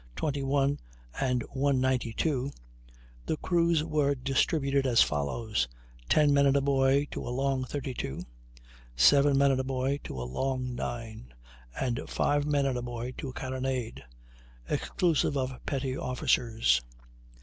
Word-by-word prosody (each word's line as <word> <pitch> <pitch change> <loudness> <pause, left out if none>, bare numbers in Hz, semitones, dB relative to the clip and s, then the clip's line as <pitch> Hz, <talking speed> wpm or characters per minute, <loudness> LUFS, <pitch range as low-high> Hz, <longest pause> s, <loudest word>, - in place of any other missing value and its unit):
21 140 -1 0 0.4
and 125 -2 +1
192), 130 0 0 0.8
the 155 - 0
crews 170 -2 +2
were 150 -3 +1
distributed 135 +1 +1
as 120 -2 +6
follows: 75 - -1 0.4
ten 150 -2 +4
men 140 0 +5
and 140 0 +4
a - - +2
boy 135 0 +3
to - - -4
a - - -5
long 135 +1 0
32. 130 - -4 0.7
seven 140 - +5
men 140 0 +5
and 130 - +1
a - - 0
boy 135 +1 -1
to 65 - -6
a - - -3
long 125 - -2
9. 115 - -6 0.5
and 120 -2 -1
five 145 0 +1
men 145 -2 +2
and 130 -2 0
a - - -4
boy 120 0 -5
to 140 - -5
a - - -8
carronade, 130 - -3 0.6
exclusive 160 - 0
of 130 -1 -3
petty 135 -2 -1
officers. 115 - +1
135 Hz, 140 wpm, -29 LUFS, 125-140 Hz, 0.8 s, as